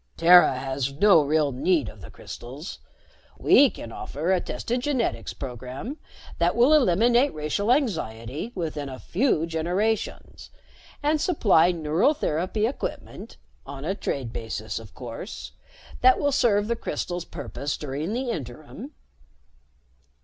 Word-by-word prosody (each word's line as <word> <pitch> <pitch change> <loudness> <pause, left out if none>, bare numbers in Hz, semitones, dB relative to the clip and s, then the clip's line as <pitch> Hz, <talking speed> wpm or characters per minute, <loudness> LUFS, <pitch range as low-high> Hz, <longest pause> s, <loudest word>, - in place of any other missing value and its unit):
"Terra 175 -5 +7
has 135 0 -2
no 185 +2 +6
real 150 0 +1
need 140 +1 +1
of 105 -2 -10
the - - -10
crystals. 135 +9 -9 0.6
We 280 -1 +6
can 115 - -9
offer 155 +9 -3
a 185 -2 +2
tested 230 - -3
genetics 260 -3 -1
program 130 - -7 0.4
that 175 +3 +2
will 245 +6 +5
eliminate 240 - +4
racial 155 +9 -1
anxiety 155 - -1
within 155 -5 -3
a 130 - -7
few 180 - 0
generations, 180 +7 -2 0.5
and 300 +1 +2
supply 190 - +4
neural 165 - +1
therapy 185 - -1
equipment 250 - -5 0.3
on 140 +1 -8
a 190 - 0
trade 135 - -4
basis, 110 -2 -4
of 110 -3 -14
course 125 - -7 0.5
that 385 0 +6
will 285 -1 +1
serve 210 -6 +2
the 235 - 0
crystals' 175 -5 -4
purpose 140 -1 -5
during 150 +6 -4
the 250 0 -2
interim." 155 - -8
170 Hz, 130 wpm, -25 LUFS, 135-230 Hz, 0.6 s, Terra